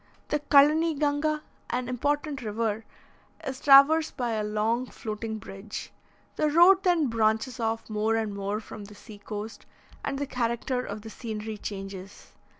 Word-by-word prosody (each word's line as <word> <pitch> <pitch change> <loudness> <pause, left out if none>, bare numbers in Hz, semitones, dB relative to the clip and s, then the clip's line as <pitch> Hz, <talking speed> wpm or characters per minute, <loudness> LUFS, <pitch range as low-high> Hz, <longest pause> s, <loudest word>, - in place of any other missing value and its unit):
The 300 - +1
Calanyganga, 300 +1 +3 0.3
an 250 0 -2
important 285 +3 -1
river, 220 0 -2 0.6
is 265 -1 -4
traversed 295 +3 +6
by 245 -2 -1
a 215 -1 -1
long 220 +4 0
floating 220 -1 -5
bridge; 195 0 -8 0.4
the 305 - +2
road 350 +5 +6
then 350 -5 +3
branches 225 +1 0
off 225 0 -2
more 220 +1 0
and 220 -2 -1
more 200 +1 -2
from 215 -1 -9
the 210 +1 -13
sea 205 0 -13
coast, 210 +1 -7 0.4
and 275 - -2
the 285 - -2
character 250 0 -1
of 205 -2 -6
the 220 - -8
scenery 220 -2 -5
changes. 195 -1 -8
230 Hz, 150 wpm, -27 LUFS, 215-285 Hz, 0.6 s, traversed